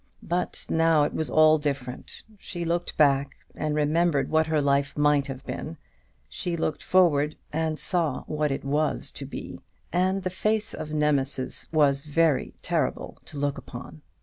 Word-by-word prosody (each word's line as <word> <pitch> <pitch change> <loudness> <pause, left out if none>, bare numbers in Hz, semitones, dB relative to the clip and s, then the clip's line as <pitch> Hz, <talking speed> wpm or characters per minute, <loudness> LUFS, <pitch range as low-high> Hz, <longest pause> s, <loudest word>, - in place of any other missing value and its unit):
But 175 +1 -2
now 165 -2 +3
it - - -1
was 160 - -2
all 155 0 +5
different. 140 -4 -4 0.2
She 175 -3 -5
looked 170 +1 -2
back, 140 -2 +3 0.2
and 155 -1 -2
remembered 150 0 +1
what 160 0 +3
her 155 -1 +2
life 140 0 +1
might 145 -1 +3
have 135 0 -7
been: 160 +1 -5 0.5
she 175 -1 -3
looked 155 -2 -2
forward, 155 -5 +3 0.2
and 160 0 -1
saw 160 -7 0
what 150 -1 -1
it 135 - -3
was 150 +2 0
to - - -7
be: - - -7 0.3
and 185 +2 +1
the 185 - -2
face 215 +3 0
of 155 - -6
Nemesis 145 -3 0
was 145 -3 +3
very 155 -1 +1
terrible - - -2
to 150 - -10
look 140 0 -1
upon. 85 - -10
150 Hz, 160 wpm, -26 LUFS, 140-165 Hz, 0.5 s, all